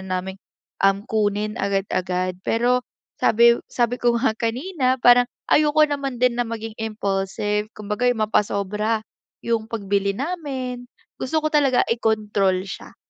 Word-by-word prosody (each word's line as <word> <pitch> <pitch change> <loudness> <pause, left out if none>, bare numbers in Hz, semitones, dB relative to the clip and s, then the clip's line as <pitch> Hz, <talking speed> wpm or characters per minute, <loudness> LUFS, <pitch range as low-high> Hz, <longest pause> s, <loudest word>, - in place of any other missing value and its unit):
naming, 185 +1 -4 0.4
um, 195 +1 +2
kunin 210 -2 0
agad-agad. 185 -2 -1
Pero, 245 +4 +1 0.4
sabi 235 +1 +5
sabi 240 0 0
ko 240 -1 +3
nga 235 -1 +2
kanina 255 +4 0
parang 245 0 +7 0.2
ayoko 300 0 +4
naman 280 -3 -3
din 250 -1 +3
na 245 - +1
maging 225 -1 -5
impulsive 210 -1 -2
kumbaga 210 +4 -1
'yong 225 -3 +1
mapasobra, 210 +1 0 0.4
'yong 225 -1 -1
pagbili 200 -3 -1
namin, 265 - -4 0.3
gusto 260 +5 -2
ko 310 - 0
talaga 275 -4 +3
i-control 210 -5 0
siya. 195 - -9
225 Hz, 130 wpm, -22 LUFS, 200-245 Hz, 0.4 s, parang